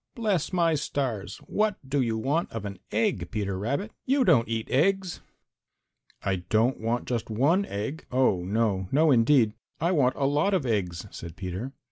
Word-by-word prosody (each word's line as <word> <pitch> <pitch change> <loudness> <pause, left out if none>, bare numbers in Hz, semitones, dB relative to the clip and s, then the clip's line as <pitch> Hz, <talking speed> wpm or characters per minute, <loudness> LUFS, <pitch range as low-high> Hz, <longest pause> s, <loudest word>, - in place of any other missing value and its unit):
"Bless 210 - 0
my 170 -3 +2
stars! 135 -7 -2
What 210 -1 +1
do 140 +1 +1
you 115 -3 0
want 145 +9 0
of 115 -2 -5
an 100 -2 -6
egg, 100 -5 0
Peter 100 -3 -2
Rabbit? 140 - -2
You 270 0 +2
don't 130 -10 +4
eat 115 -1 -2
eggs." 185 +5 +1 1.0
"I 95 -1 0
don't 110 +8 +1
want 115 +2 -1
just 120 -3 -2
one 145 - +2
egg, 110 +11 -5
oh, 125 -8 +2
no, 100 -1 0
no 155 +2 +4
indeed! 120 -2 +4 0.3
I 170 - +1
want 135 -7 +3
a 140 - 0
lot 150 +8 +2
of 165 -8 0
eggs," 95 -6 -1
said 85 -1 -8
Peter. 95 +8 -5
125 Hz, 170 wpm, -27 LUFS, 105-160 Hz, 1.0 s, don't